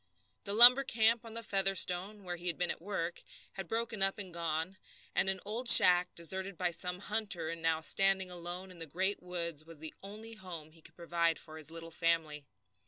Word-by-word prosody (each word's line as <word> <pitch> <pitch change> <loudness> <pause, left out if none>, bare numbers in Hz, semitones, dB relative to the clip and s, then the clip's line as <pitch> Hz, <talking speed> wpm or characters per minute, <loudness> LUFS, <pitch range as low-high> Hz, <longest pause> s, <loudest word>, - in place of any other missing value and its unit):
The 200 - -2
lumber 245 +4 +10
camp 230 -2 +1
on 225 -1 -11
the 230 - -4
Featherstone, 195 0 -1
where 180 -1 -5
he 175 +1 -9
had 170 - -1
been 180 - -1
at - - -8
work, 175 -3 -4 0.3
had 195 -3 -7
broken 230 -1 -3
up 195 0 +2
and 190 -4 -8
gone, 165 +2 -3 0.4
and 190 - +1
an 190 -1 -1
old 235 +4 -2
shack, 180 0 +7
deserted 190 +3 -3
by 180 0 -1
some 180 +2 -2
hunter, 200 -6 -2
and 165 0 -6
now 160 -1 0
standing 190 +2 0
alone 175 +2 -7
in 175 - -13
the 165 - -8
great 190 +6 -2
woods, 170 -4 -5
was 165 0 -14
the 155 +1 -9
only 215 +3 -10
home 175 -7 -10
he 165 0 -17
could - - -13
provide 170 -1 -1
for 155 -1 -12
his 155 -1 -4
little 165 0 -9
family. 160 -3 -1
180 Hz, 205 wpm, -32 LUFS, 165-200 Hz, 0.4 s, lumber